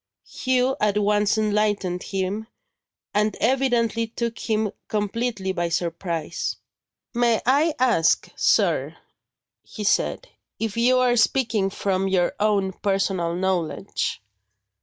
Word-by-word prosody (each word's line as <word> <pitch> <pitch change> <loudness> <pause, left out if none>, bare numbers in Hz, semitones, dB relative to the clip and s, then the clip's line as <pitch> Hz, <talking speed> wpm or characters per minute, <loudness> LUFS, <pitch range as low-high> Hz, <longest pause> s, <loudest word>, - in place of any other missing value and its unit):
Hugh 255 0 0
at 210 -1 +2
once 210 0 +2
enlightened 210 -4 0
him, 195 +3 -3 0.7
and 210 0 +1
evidently 235 -3 +1
took 235 0 -4
him 215 -2 0 0.2
completely 210 -1 -2
by 175 -2 -1
surprise. 170 -1 -2 0.6
"May 235 -2 +2
I 295 +5 +3
ask, 240 -10 +3
sir," - - +2 0.6
he 215 - -8
said, - - +1 0.3
"if 220 -2 -3
you 245 +2 +3
are 250 -1 +3
speaking 220 -4 +2
from 195 -1 -1
your 185 -2 +1
own 200 -2 +1
personal 195 -3 -1
knowledge?" 185 - -2
210 Hz, 110 wpm, -23 LUFS, 190-235 Hz, 0.7 s, I